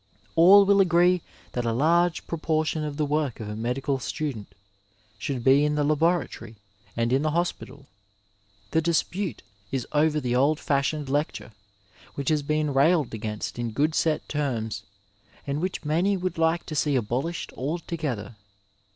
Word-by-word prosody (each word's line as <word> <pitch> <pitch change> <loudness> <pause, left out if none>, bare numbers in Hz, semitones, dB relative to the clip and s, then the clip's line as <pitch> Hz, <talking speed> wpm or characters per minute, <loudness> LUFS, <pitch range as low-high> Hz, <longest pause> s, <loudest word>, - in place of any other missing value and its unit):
All 195 +5 +8
will 200 0 +5
agree 175 0 +4 0.3
that 120 - -2
a 115 - 0
large 165 +7 +2
proportion 155 -1 -1
of 150 -1 -4
the 155 - +1
work 145 -3 -1
of 110 - -6
a 105 - -5
medical 130 +4 -1
stu 150 +2 -3
dent 105 -3 -11 0.6
should 130 -1 -3
be 135 +3 +5
in 150 0 +1
the 150 - +1
laboratory 155 -6 0 0.4
and 115 +1 +1
in 135 - +3
the 155 - +1
hospital. 150 -4 -3 0.9
The 160 - +2
dispute 170 +3 -1 0.3
is 135 -2 -2
over 150 0 +2
the 125 -3 -1
old 145 +4 +3
fashioned 145 +1 0
lecture, 145 -3 -2 0.6
which 140 +1 -2
has 155 -2 +2
been 150 0 0
railed 145 0 +3
against 110 +1 -5
in 120 -1 -2
good 150 +6 +1
set 155 -1 0
terms, 115 -8 -2 0.6
and 140 +2 -2
which 185 -3 -3
many 175 +6 +1
would 185 -2 -3
like 165 +1 +1
to 155 - -6
see 145 -1 +1
abolished 130 +8 -2
altogether. 145 - -4
150 Hz, 160 wpm, -26 LUFS, 130-165 Hz, 0.9 s, All